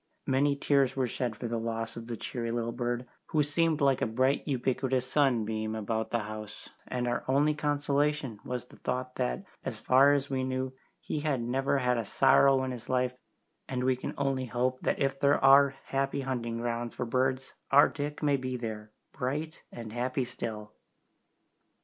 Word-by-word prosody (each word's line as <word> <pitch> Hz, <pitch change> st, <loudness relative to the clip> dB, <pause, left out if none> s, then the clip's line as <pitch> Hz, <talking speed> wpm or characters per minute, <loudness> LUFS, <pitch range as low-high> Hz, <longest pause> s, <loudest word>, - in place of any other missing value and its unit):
Many 140 Hz, +2 st, +2 dB
tears 140 Hz, -2 st, +2 dB
were 130 Hz, -1 st, +1 dB
shed 120 Hz, -1 st, -2 dB
for 110 Hz, +3 st, -5 dB
the 115 Hz, 0 st, -2 dB
loss 115 Hz, 0 st, -3 dB
of 115 Hz, 0 st, -8 dB
the 120 Hz, -1 st, -4 dB
cheery 115 Hz, +1 st, -4 dB
little 115 Hz, 0 st, -1 dB
bird, 120 Hz, +1 st, -2 dB, 0.2 s
who 155 Hz, -2 st, +2 dB
seemed 160 Hz, +1 st, +1 dB
like 135 Hz, -2 st, +3 dB
a -, -, +2 dB
bright 130 Hz, +5 st, +2 dB
ubiquitous 130 Hz, -1 st, 0 dB
sunbeam 110 Hz, -6 st, +1 dB
about 110 Hz, +1 st, -2 dB
the 120 Hz, -, 0 dB
house, 105 Hz, 0 st, -8 dB, 0.2 s
and 125 Hz, -1 st, -2 dB
our 120 Hz, 0 st, -1 dB
only 145 Hz, +3 st, +3 dB
consolation 145 Hz, -4 st, 0 dB
was 125 Hz, -1 st, -4 dB
the -, -, -17 dB
thought 125 Hz, 0 st, -3 dB
that, 60 Hz, 0 st, -1 dB, 0.2 s
as -, -, -4 dB
far 135 Hz, +3 st, +5 dB
as 140 Hz, -1 st, 0 dB
we 130 Hz, -2 st, -1 dB
knew, 130 Hz, 0 st, -2 dB, 0.3 s
he 150 Hz, -, -3 dB
had 145 Hz, -3 st, 0 dB
never 135 Hz, +3 st, +1 dB
had 125 Hz, -2 st, +1 dB
a -, -, -1 dB
sorrow 135 Hz, +5 st, +4 dB
in 130 Hz, -, -2 dB
his 120 Hz, -1 st, -8 dB
life, 125 Hz, -1 st, +1 dB, 0.6 s
and 125 Hz, -1 st, -1 dB
we 130 Hz, 0 st, +3 dB
can 125 Hz, -, -6 dB
only 135 Hz, -2 st, 0 dB
hope 125 Hz, +2 st, -1 dB
that -, -, 0 dB
if 135 Hz, -1 st, 0 dB
there 140 Hz, +1 st, +4 dB
are 135 Hz, 0 st, +7 dB
"happy 135 Hz, +1 st, 0 dB
hunting 120 Hz, -3 st, -3 dB
grounds" 120 Hz, 0 st, -3 dB
for 125 Hz, -, -2 dB
birds 130 Hz, +2 st, 0 dB, 0.2 s
our 140 Hz, +1 st, +7 dB
Dick 145 Hz, +1 st, -5 dB
may 145 Hz, -2 st, +3 dB
be 130 Hz, -1 st, -3 dB
there, 110 Hz, -3 st, -5 dB, 0.2 s
bright 150 Hz, +5 st, -3 dB
and 115 Hz, -2 st, -8 dB
happy 125 Hz, +2 st, -1 dB
still. 105 Hz, -3 st, -6 dB
130 Hz, 185 wpm, -30 LUFS, 120-140 Hz, 0.6 s, are